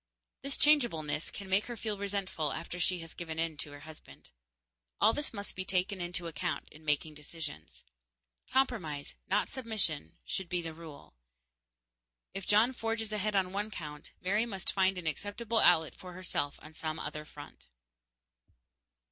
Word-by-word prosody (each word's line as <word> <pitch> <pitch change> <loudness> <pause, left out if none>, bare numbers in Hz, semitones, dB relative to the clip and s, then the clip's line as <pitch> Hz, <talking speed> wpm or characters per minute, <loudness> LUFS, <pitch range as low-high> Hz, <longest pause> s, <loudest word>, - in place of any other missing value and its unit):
This 275 0 -1
changeableness 225 - +4
can 200 - -7
make 190 +2 +3
her 240 -1 -5
feel 215 -1 -1
resentful 195 -6 -1
after 170 +1 -4
she 180 0 +2
has 165 0 -9
given 160 -2 -5
in 165 -1 0
to 145 - -3
her 145 0 -10
husband. 150 - -13 0.7
All 220 - +6
this 295 - -1
must 200 -2 -3
be 185 - -1
taken 185 +1 0
into 175 0 -2
account 165 +1 -2
in 155 - -14
making 150 +1 +1
decisions. 150 - -7 0.7
Compromise, 195 - +1
not 200 - +3
submission, 215 - 0
should 190 -3 -2
be 180 - +1
the 165 -1 -4
rule. 155 - -11 1.2
If 195 -2 -5
John 220 +5 +6
forges 225 -2 -1
ahead 210 0 0
on 185 -1 +2
one 205 +2 0
count, 150 -7 -7
Mary 210 +5 +2
must 195 -4 -1
find 190 -1 +3
an 180 - -4
acceptable 205 - 0
outlet 160 -5 +6
for 180 -1 -10
herself 175 -5 -1
on 155 - -10
some 155 0 -3
other 150 0 -4
front. 150 - -12
180 Hz, 160 wpm, -33 LUFS, 155-210 Hz, 1.2 s, All